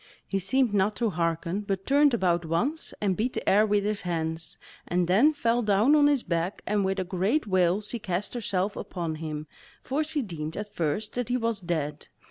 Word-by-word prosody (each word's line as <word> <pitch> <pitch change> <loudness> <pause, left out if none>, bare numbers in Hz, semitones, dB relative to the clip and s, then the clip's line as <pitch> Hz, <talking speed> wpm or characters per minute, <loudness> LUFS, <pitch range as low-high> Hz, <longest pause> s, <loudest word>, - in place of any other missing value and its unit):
He 195 - -1
seemed 245 +4 +1
not 205 +1 +2
to 230 -1 0
hearken, 170 +2 -1
but 195 -2 -3
turned 285 -2 +4
about 175 -5 +1
once, 240 - -1
and 195 -3 +1
beat 240 +6 -1
the - - -4
air 210 +2 +5
with 205 -1 +2
his 210 0 -1
hands, 160 -2 -3 0.3
and 175 -1 +1
then 220 - +5
fell 240 -5 +1
down 215 +6 +4
on 290 -1 +6
his 285 -4 +2
back 170 +2 -2
and 210 -1 +1
with 190 +1 0
a 190 - 0
great 190 - 0
wail 185 -1 +2
she 220 +3 -4
cast 190 0 -2
herself 200 -4 -1
upon 170 -3 -4
him, 155 -1 -4 0.4
for 285 +4 0
she 305 -2 -2
deemed 160 -6 -5
at 210 0 -5
first 175 +7 -2
that 245 -1 -3
he 250 - +2
was 230 -3 -1
dead. 155 -5 -3
200 Hz, 205 wpm, -27 LUFS, 175-230 Hz, 0.4 s, on